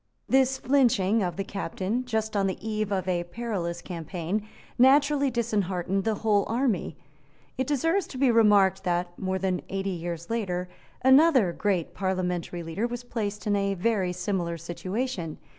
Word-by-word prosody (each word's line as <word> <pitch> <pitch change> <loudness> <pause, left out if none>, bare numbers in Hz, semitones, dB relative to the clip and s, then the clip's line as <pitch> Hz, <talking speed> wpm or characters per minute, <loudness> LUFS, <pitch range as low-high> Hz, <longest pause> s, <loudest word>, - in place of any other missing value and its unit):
This 265 0 +3
flinching 230 -7 +3
of 175 -3 -1
the 195 - -2
captain, 200 +5 -3
just 220 -3 -2
on 195 -1 +2
the 190 - -2
eve 215 -1 -2
of 190 -2 -1
a 175 -2 0
perilous 175 -4 -4
campaign, 180 +4 -4 0.3
naturally 280 +2 +5
disheartened 195 -5 -1
the 220 -1 +1
whole 205 -2 +4
army. 230 - -1 0.6
It 260 0 -2
deserves 330 +7 +1
to 260 - -8
be 260 -1 +4
remarked 205 -4 +4
that, 175 -1 0
more 190 0 -1
than 185 -1 -1
eighty 195 0 -2
years 170 +1 -5
later, 185 -6 -2 0.4
another 265 - +5
great 190 -5 -1
parliamentary 180 -2 -2
leader 165 +8 -2
was 240 0 -6
placed 210 -4 -4
in 205 -1 +2
a 200 0 0
very 195 -1 0
similar 180 -2 -2
situation. 175 - -4
200 Hz, 155 wpm, -27 LUFS, 180-235 Hz, 0.6 s, naturally